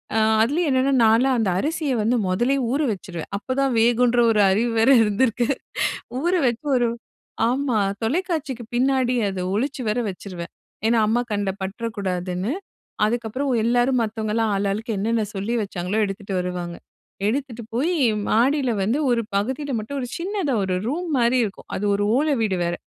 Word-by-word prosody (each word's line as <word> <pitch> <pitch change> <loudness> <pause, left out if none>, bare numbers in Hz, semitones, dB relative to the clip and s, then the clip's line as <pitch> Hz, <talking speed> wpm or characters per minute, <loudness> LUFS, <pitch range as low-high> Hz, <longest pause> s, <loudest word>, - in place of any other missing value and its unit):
அ - - +3 0.2
அதுலயும் 300 +9 +1
என்னான்னா, 265 +1 +2
நான்ல்லாம் 245 +4 +4
அந்த 215 -4 +1
அரிசிய 305 - -1
வந்து 235 +4 +2
மொதலயே 245 +9 +1
ஊற 285 +3 +1
வச்சிருவேன். 175 -3 -7
அப்ப 255 +5 -4
தான் 270 -2 +1
வேகுன்ற 240 +1 +3
ஒரு 210 - +3
அறிவு 230 +5 +1
வேற 225 +4 +4
இருந்திருக்கு. 230 +3 +1 0.7
ஊற 350 +2 +1 0.2
வச்சு 240 +5 -2
ஒரு 240 -1 +2 0.6
ஆமா, 255 -3 0 0.2
தொலைக்காட்சிக்கு 300 -2 -1
பின்னாடி 255 0 +2
அத 190 -1 -4
ஒழிச்சு 260 +5 -1
வேற 230 +3 0
வச்சிருவேன். 180 -2 -7 0.4
ஏன்னா, 230 0 +3
அம்மா 240 +3 +2
கண்ல 205 -1 0
பட்றக்கூடாதுன்னு, 190 -1 -3 0.5
அதுக்கப்புறம் 240 +5 -2
எல்லாரும் 245 +2 +2
மத்தவங்கல்லாம் 220 0 -1
ஆளு 200 +1 0
ஆளுக்கு 225 +4 -3
என்னென்ன 220 +2 0
சொல்லி 200 +5 -2
வச்சாங்களோ! 190 +1 -3
எடுத்துட்டு 195 0 -5
வருவாங்க. 180 -1 -4 0.5
எடுத்துட்டு 245 0 -2
போயி 330 +9 +1 0.3
மாடில 260 +3 +2
வந்து 235 +9 +1
ஒரு 235 -1 +2
பகுதில 260 +7 -1
மட்டும், 275 +6 -5
ஒரு 245 - -5
சின்னதா 360 - -1
ஒரு 185 -1 -1
ரூம்மாரி 270 -6 +1
இருக்கும். 200 - -9
அது 205 - -2
ஒரு 205 - 0
ஓலை 295 0 +2
வீடு 210 -4 +1
வேற! 170 0 -1
235 Hz, 150 wpm, -23 LUFS, 205-265 Hz, 0.7 s, நான்ல்லாம்